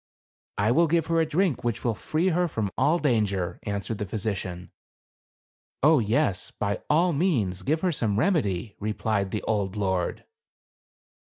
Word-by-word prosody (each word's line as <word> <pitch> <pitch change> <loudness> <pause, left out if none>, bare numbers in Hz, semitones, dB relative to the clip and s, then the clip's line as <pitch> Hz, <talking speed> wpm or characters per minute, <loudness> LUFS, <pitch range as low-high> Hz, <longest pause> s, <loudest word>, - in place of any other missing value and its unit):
" - - -
I 105 +3 +2
will 165 +6 +4
give 165 0 +2
her 165 - +4
a 160 - +1
drink 160 -5 0
which 120 -2 -2
will 120 - +1
free 155 - 0
her 175 +1 +1
from 110 - -2
all 160 +4 +3
danger," 100 - 0
answered 100 +1 -4
the 105 - -2
physician. 95 -3 -4 0.6
" - - -9
0, 155 -1 +6
yes! 105 -4 0
by 100 -1 -3
all 170 +3 +3
means 125 - 0
give 155 - 0
her 185 - +2
some 110 -9 0
remedy," 110 - 0
replied 105 -1 -1
the 105 - -3
old 100 -3 -1
lord. 95 -4 -1
110 Hz, 165 wpm, -26 LUFS, 100-155 Hz, 0.6 s, 0